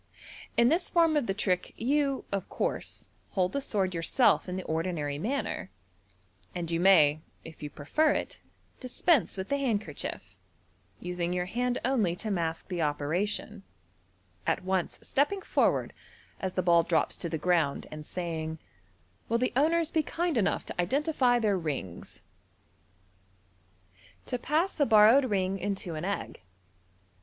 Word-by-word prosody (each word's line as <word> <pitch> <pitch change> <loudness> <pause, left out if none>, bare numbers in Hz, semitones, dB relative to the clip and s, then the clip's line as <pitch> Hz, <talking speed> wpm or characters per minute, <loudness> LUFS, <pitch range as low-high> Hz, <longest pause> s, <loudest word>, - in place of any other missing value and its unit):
In 235 +1 +6
this 340 +4 +1
form 330 -2 +3
of 290 -5 +1
the 195 - +1
trick 185 -3 -1
you, 275 +2 0
of 200 -2 -2
course, - - -3 0.3
hold 185 -2 +1
the 280 - -2
sword 195 -7 0
yourself 180 +5 +2
in 180 - -3
the 185 - -4
ordinary 160 -3 -2
manner, 240 - -2 0.9
and 170 -2 -3
you 165 - 0
may, 155 -5 +5 0.2
if 160 -1 -11
you 150 - -5
prefer 160 - +1
it, - - -4 0.4
dispense 260 - +1
with 190 0 -4
the 280 - +1
handkerchief, 170 - -3 0.6
using 180 -1 -3
your 180 0 -1
hand 245 +5 -1
only 225 -10 +1
to 215 +4 -4
mask 165 -3 -2
the 180 -3 -3
operation, 175 +8 -1 0.9
at - - +1
once 190 -1 -1
stepping 375 +8 0
forward, - - +1 0.5
as 190 -1 -3
the 185 - 0
ball 170 -1 +5
drops 165 -1 +1
to 170 - -4
the 160 - -2
ground, 160 -3 +1
and 155 0 -7
saying, 165 -3 -3
m 160 0 -7 0.7
Will 230 - +2
the 250 +2 0
owners 320 +4 +2
be 320 - +2
kind 335 +1 -2
enough 205 -4 +1
to - - -2
identify 260 - +2
their 210 -5 +1
rings? 135 - -5 1.0
" 95 0 -31
To 250 - -3
Pass 320 +8 0
a 285 - +5
Borrowed 225 +5 +7
Ring 195 -4 0
into 195 -2 -3
an 155 +2 -4
Egg. 200 - -4
190 Hz, 150 wpm, -29 LUFS, 160-250 Hz, 1.0 s, Borrowed